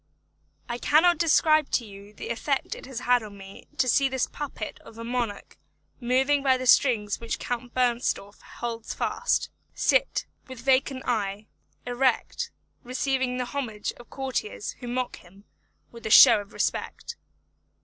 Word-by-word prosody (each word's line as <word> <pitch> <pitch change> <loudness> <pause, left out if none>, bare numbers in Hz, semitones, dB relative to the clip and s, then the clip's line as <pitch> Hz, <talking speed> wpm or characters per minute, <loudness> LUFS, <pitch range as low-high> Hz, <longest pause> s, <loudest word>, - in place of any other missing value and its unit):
I 240 0 -4
cannot 325 +4 +4
describe 310 -2 +4
to 240 - +1
you 200 0 -12
the 210 - -8
effect 265 +4 -1
it - - -10
had 245 -1 +1
on 210 -2 -10
me 195 0 -12
to 255 - +2
see 270 +2 +3
this 265 -1 0
puppet 275 -7 -6
of 225 - -15
a 230 - -6
monarch 235 -3 -4 0.4
moved 265 +3 +2
by 260 -2 +4
the 255 - -5
strings 230 -5 +4
which 230 -1 -3
Count 245 0 -5
Bernstorff 240 -5 0
holds 230 -1 -6
fast; 485 - 0 0.2
sit, - - +2 0.2
with 260 -2 -9
vacant 265 0 +2
eye, 210 -3 -1 0.4
erect, 245 0 0 0.3
receiving 255 0 -1
the 250 - -1
homage 240 -6 -4
of 240 - -15
courtiers 260 -6 -3
who 245 - -7
mock 250 +1 -2
him 190 +3 -18 0.5
with 235 -1 -12
a - - -3
show 230 -1 +9
of 200 - -14
respect. - - -3
245 Hz, 150 wpm, -26 LUFS, 225-265 Hz, 0.5 s, show